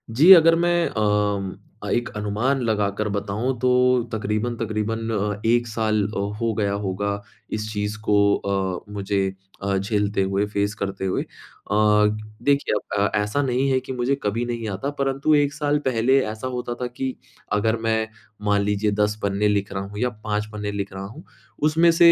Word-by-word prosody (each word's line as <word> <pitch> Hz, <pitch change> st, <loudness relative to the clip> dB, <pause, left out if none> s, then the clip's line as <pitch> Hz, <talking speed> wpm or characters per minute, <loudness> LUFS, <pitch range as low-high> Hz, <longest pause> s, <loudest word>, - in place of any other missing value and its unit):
जी, 165 Hz, +8 st, +7 dB
अगर 165 Hz, -2 st, +7 dB
मैं 175 Hz, 0 st, +2 dB
अम 105 Hz, -2 st, +1 dB, 0.3 s
अ, 105 Hz, -, -4 dB
एक 120 Hz, 0 st, 0 dB
अनुमान 110 Hz, +7 st, 0 dB
लगाकर 105 Hz, 0 st, 0 dB
बताऊँ 105 Hz, +6 st, -2 dB
तो 125 Hz, -, +2 dB, 0.4 s
तकरीबन-तकरीबन 110 Hz, 0 st, -2 dB
अ, 105 Hz, -1 st, -1 dB
1 120 Hz, +1 st, +3 dB
साल 110 Hz, -1 st, 0 dB
अ, 110 Hz, -, -4 dB, 0.2 s
हो 115 Hz, -1 st, +1 dB
गया 100 Hz, -1 st, +1 dB
होगा 100 Hz, +2 st, -2 dB, 0.4 s
इस 105 Hz, 0 st, -4 dB
चीज़ 105 Hz, +1 st, -2 dB
को 105 Hz, -, +3 dB, 0.2 s
अ, 95 Hz, 0 st, -2 dB
मुझे 100 Hz, 0 st, -1 dB, 0.4 s
अ, 100 Hz, 0 st, 0 dB
झेलते 100 Hz, 0 st, 0 dB
हुए 95 Hz, +2 st, +1 dB
फेस 100 Hz, +1 st, 0 dB
करते 100 Hz, -2 st, -3 dB
हुए। 95 Hz, -, 0 dB
अ, -, -, -17 dB, 1.2 s
देखिए 140 Hz, -6 st, +2 dB, 0.3 s
अब 105 Hz, -, +2 dB
ऐसा 105 Hz, +7 st, +1 dB
नहीं 135 Hz, 0 st, +1 dB
है 130 Hz, -, +3 dB
कि 130 Hz, -, -7 dB
मुझे 125 Hz, +2 st, 0 dB
कभी 115 Hz, +4 st, 0 dB
नहीं 115 Hz, -2 st, -3 dB
आता 100 Hz, +8 st, -3 dB
परंतु 135 Hz, +3 st, +1 dB
1 145 Hz, -1 st, +2 dB
साल 150 Hz, -1 st, 0 dB
पहले 130 Hz, +3 st, +3 dB
ऐसा 110 Hz, +4 st, -5 dB
होता 125 Hz, -1 st, -3 dB
था 125 Hz, -, 0 dB
कि 130 Hz, +1 st, -4 dB, 0.4 s
अगर 110 Hz, +2 st, +2 dB
मैं 110 Hz, 0 st, +1 dB, 0.4 s
मान 105 Hz, 0 st, +3 dB
लीजिए 105 Hz, +1 st, +1 dB
10 105 Hz, +1 st, -1 dB
पन्ने 100 Hz, +1 st, +1 dB
लिख 100 Hz, -1 st, 0 dB
रहा 95 Hz, -, -3 dB
हूँ 105 Hz, +1 st, -8 dB
या 125 Hz, -, +1 dB
5 105 Hz, 0 st, -1 dB
पन्ने 105 Hz, -1 st, -4 dB
लिख 100 Hz, -1 st, -4 dB
रहा 95 Hz, 0 st, -6 dB
हूँ। 115 Hz, -, -10 dB, 0.5 s
उसमें 165 Hz, +2 st, +4 dB
से 170 Hz, 0 st, +7 dB
105 Hz, 175 wpm, -23 LUFS, 100-125 Hz, 1.2 s, जी